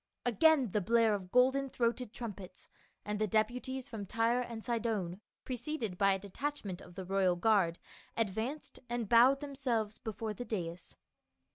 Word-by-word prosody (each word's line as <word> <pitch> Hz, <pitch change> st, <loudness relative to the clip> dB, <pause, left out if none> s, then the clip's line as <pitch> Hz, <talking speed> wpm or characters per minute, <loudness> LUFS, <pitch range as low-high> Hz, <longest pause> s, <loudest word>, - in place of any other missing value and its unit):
Again 265 Hz, -, +4 dB
the 210 Hz, -, +1 dB
blare 225 Hz, +2 st, +4 dB
of 185 Hz, -3 st, -4 dB
golden 265 Hz, +2 st, +4 dB
throated 240 Hz, -1 st, -1 dB
trumpets, 200 Hz, -7 st, -8 dB, 0.4 s
and 210 Hz, 0 st, -2 dB
the 215 Hz, -, +1 dB
deputies 245 Hz, +5 st, -1 dB
from 210 Hz, -4 st, -6 dB
Tyre 230 Hz, +3 st, +2 dB
and 230 Hz, -2 st, -6 dB
Sidon, 220 Hz, -6 st, -2 dB, 0.2 s
preceded 245 Hz, -5 st, -3 dB
by 195 Hz, +1 st, +4 dB
a -, -, 0 dB
de 195 Hz, +1 st, -10 dB
tachment 275 Hz, -9 st, -4 dB
of 175 Hz, -, -13 dB
the 190 Hz, -1 st, -6 dB
royal 190 Hz, -1 st, +2 dB
guard, 180 Hz, -3 st, +3 dB, 0.4 s
advanced 225 Hz, +7 st, -2 dB
and 240 Hz, -2 st, -2 dB
bowed 250 Hz, +6 st, +6 dB
themselves 250 Hz, -7 st, -2 dB
before 220 Hz, 0 st, -4 dB
the 230 Hz, -, -6 dB
dais. 180 Hz, -7 st, -5 dB
225 Hz, 155 wpm, -33 LUFS, 195-250 Hz, 0.4 s, bowed